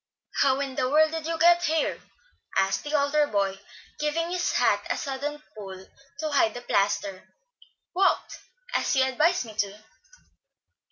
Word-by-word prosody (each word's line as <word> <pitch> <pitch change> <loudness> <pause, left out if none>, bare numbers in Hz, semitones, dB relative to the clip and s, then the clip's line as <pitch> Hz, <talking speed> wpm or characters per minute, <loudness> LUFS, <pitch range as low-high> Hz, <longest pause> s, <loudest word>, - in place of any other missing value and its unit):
"How 270 -1 +3
in 275 -2 -3
the 255 0 0
world 310 +2 +4
did 325 -1 -4
you 330 0 -1
get 345 +1 +5
here?" 320 -1 0 0.6
asked 195 0 +1
the 295 - -5
elder 295 +1 +3
boy, 195 -3 -1 0.4
giving 325 +3 -1
his 360 -1 0
hat - - +2
a - - 0
sudden 290 +2 -4
pull 190 -3 -9 0.4
to 310 -1 -2
hide 225 -6 +3
the 245 - -6
plaster. 200 -3 -1 0.7
"Walked, 385 +1 +1 0.3
as - - +1
you 265 - +4
advised 300 +5 +2
me 220 - -10
to." 205 +1 -2
280 Hz, 155 wpm, -26 LUFS, 215-315 Hz, 0.7 s, get